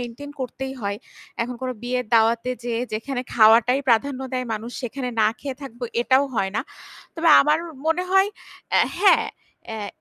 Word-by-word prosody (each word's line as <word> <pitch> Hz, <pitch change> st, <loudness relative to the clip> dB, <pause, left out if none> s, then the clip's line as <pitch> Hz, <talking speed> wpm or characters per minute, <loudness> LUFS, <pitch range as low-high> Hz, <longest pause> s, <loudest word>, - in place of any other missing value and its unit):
Maintain 245 Hz, +4 st, -7 dB
করতেই 265 Hz, +1 st, -4 dB
হয়। 200 Hz, -1 st, -2 dB, 0.5 s
এখন 245 Hz, +2 st, -4 dB
কোনো 255 Hz, 0 st, -2 dB
বিয়ের 250 Hz, 0 st, -2 dB
দাওয়াতে 230 Hz, +2 st, +3 dB
যেয়ে 235 Hz, 0 st, -1 dB
যেখানে 245 Hz, +4 st, -3 dB
খাওয়াটাই 230 Hz, +4 st, +5 dB
প্রাধান্য 255 Hz, +3 st, +2 dB
দেয় 255 Hz, -1 st, -2 dB
মানুষ 220 Hz, +2 st, -6 dB
সেখানে 250 Hz, +1 st, -4 dB
না 215 Hz, -, +5 dB
খেয়ে 275 Hz, -2 st, -5 dB
থাকবো 245 Hz, -2 st, -7 dB, 0.2 s
এটাও 260 Hz, +3 st, +4 dB
হয় 190 Hz, -3 st, 0 dB
না। -, -, +1 dB, 0.5 s
তবে 330 Hz, -1 st, +1 dB
আমার 300 Hz, +2 st, +3 dB, 0.3 s
মনে 325 Hz, +3 st, +2 dB
হয় 385 Hz, +1 st, +4 dB, 0.5 s
এ -, -, +6 dB, 0.2 s
হ্যাঁ, 400 Hz, +1 st, +5 dB, 0.4 s
অ্যা 220 Hz, -2 st, -5 dB
250 Hz, 160 wpm, -23 LUFS, 230-275 Hz, 0.5 s, এ